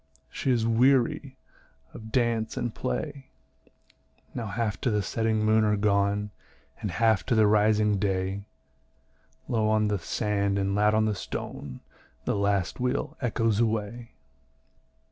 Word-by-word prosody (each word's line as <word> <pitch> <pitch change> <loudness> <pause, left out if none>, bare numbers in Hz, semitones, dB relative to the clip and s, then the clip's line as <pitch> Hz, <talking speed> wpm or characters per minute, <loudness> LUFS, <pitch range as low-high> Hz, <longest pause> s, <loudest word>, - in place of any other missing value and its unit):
She - - -3
is 120 -3 +2
weary 130 +4 +2 0.6
of 110 0 -10
dance 115 -3 0
and 120 -2 -2
play." 130 - -4 1.1
Now 115 -2 -4
half 105 +2 -2
to 125 - +1
the 105 -2 0
setting 110 0 0
moon 110 0 +4
are 105 -1 +2
gone, 100 0 +1 0.5
And 105 - -2
half 110 +3 +2
to 120 - +2
the 110 -1 +5
rising 105 -1 +3
day; 95 0 -1 1.0
Low 110 -4 +1
on 110 -1 +2
the 105 -2 0
sand 100 +1 -1
and 100 0 0
loud 105 +1 +3
on 110 0 +3
the 110 - +1
stone 70 -8 -6 0.4
The - - 0
last 100 -1 0
wheel 125 0 -1
echoes 115 -3 +1
away. 115 +1 -2
110 Hz, 140 wpm, -27 LUFS, 100-115 Hz, 1.1 s, the